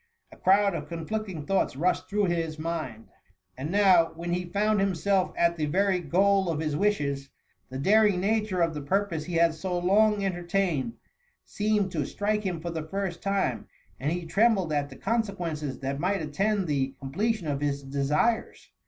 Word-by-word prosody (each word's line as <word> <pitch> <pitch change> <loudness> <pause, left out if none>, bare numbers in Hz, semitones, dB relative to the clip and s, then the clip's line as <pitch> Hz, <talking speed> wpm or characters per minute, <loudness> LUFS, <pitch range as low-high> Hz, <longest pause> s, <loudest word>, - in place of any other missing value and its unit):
A - - -13
crowd 200 +1 +3
of - - -5
conflicting 170 -1 -4
thoughts 195 -7 0
rushed 175 +7 0
through 210 0 +1
his 165 -3 -1
mind; 155 -9 -5 0.5
and 135 +4 -5
now, 185 -4 +4
when 170 +1 -3
he 180 0 -1
found 210 +4 +1
himself 195 0 +1
at 170 0 +2
the 155 -1 -1
very 190 +4 +2
goal 190 +3 +2
of 160 -2 -1
his 155 -2 -1
wishes, 145 -8 0 0.4
the 130 - -6
daring 205 +5 +4
nature 210 -2 0
of 165 -1 0
the 150 - -5
purpose 170 0 -1
he 175 - -4
had 165 -1 +4
so 180 +3 -3
long 200 +3 +3
entertained, 175 - -1 0.5
seemed 210 -2 0
to 155 -4 -2
strike 210 +1 -1
him 185 -5 -3
for 170 +1 -4
the 160 -1 -3
first 195 -1 -3
time, 195 - -1 0.3
and 145 +4 -1
he 175 0 -3
trembled 195 -3 +2
at 145 -1 0
the 135 - -11
consequences 180 - -2
that 135 +1 -3
might 185 +1 0
attend 195 +7 0
the 135 -3 -1
com 135 0 -7
pletion 215 +2 0
of 145 -2 -2
his 140 -1 -1
desires. 140 +11 -1
175 Hz, 180 wpm, -27 LUFS, 155-200 Hz, 0.5 s, now